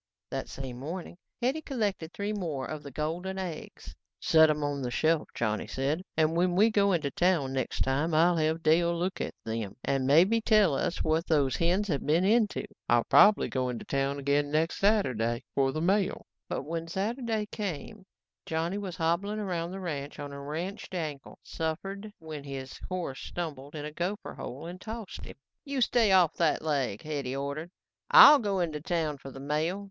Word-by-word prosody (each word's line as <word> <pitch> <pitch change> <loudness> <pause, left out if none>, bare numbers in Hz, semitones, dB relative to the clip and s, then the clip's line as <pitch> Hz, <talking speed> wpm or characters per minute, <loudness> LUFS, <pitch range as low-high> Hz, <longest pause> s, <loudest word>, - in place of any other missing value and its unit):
That 135 -1 -4
same 130 -2 -7
morning, 170 +5 -6 0.3
Hetty 270 +6 +1
collected 205 - -2
three 205 +2 -3
more 160 -10 -3
of 155 -1 -5
the 145 - -9
golden 165 +7 -3
eggs. 180 -5 -7 0.3
"Set 160 -1 +5
'em 150 -1 0
on 145 -1 -2
the 125 - -2
shelf," 155 +5 +1
Johnny 110 -2 -1
said, 140 +6 -1 0.2
"and 160 0 +3
when 175 +1 +2
we 215 +4 +5
go 200 -2 +3
into 155 -6 0
town 170 -7 +1
next 130 -2 -2
time 145 +5 +1
I'll 170 +2 +4
have 160 +1 0
Dale 170 +2 +3
look 180 +2 -2
at - - -4
them 110 -3 -4
and 135 -1 0
maybe 185 +11 +5
tell 215 -7 +4
us 150 +5 -1
what 160 +2 +1
those 145 -5 +2
hens 180 +5 +1
have 145 -7 -1
been 165 +5 +2
into. 215 0 +2 0.2
I'll 120 0 +4
probably 210 0 +6
go 130 -1 -1
into 125 - -5
town 140 0 -1
again 145 +1 +1 0.2
Saturday 125 - +1
for 135 -1 +2
the 155 - -3
mail." 195 +3 +1 0.2
But - - -2
when 165 +3 -4
Saturday 220 +4 -2
came, 200 0 -5 0.4
Johnny 165 +5 -1
was 190 -4 -5
hobbling 175 +5 0
around 175 -5 -2
the 190 +2 -6
ranch 145 -6 -5
on 145 -1 -6
a 140 - -7
wrenched 170 +7 -5
ankle, 150 -5 -5
suffered 195 +6 -4
when 155 -3 -8
his 135 -2 -7
horse 180 -7 -3
stumbled 145 -4 -6
in 150 -1 -5
a 150 - -5
gopher 180 +6 -4
hole 135 +6 -7
and 180 +2 -8
tossed 220 -2 -7
him. - - -10 0.3
"You 280 -2 -3
stay 235 -3 +3
off 180 -4 +5
that 165 -3 +2
leg," 140 -9 -1
Hetty 140 -4 -3
ordered. 140 +4 -4 0.4
"I'll 295 0 +10
go 200 -5 0
into 155 -3 -2
town 160 -4 -1
for 135 - -9
the 135 - -10
mail. 155 +7 -1
160 Hz, 185 wpm, -29 LUFS, 140-190 Hz, 0.4 s, I'll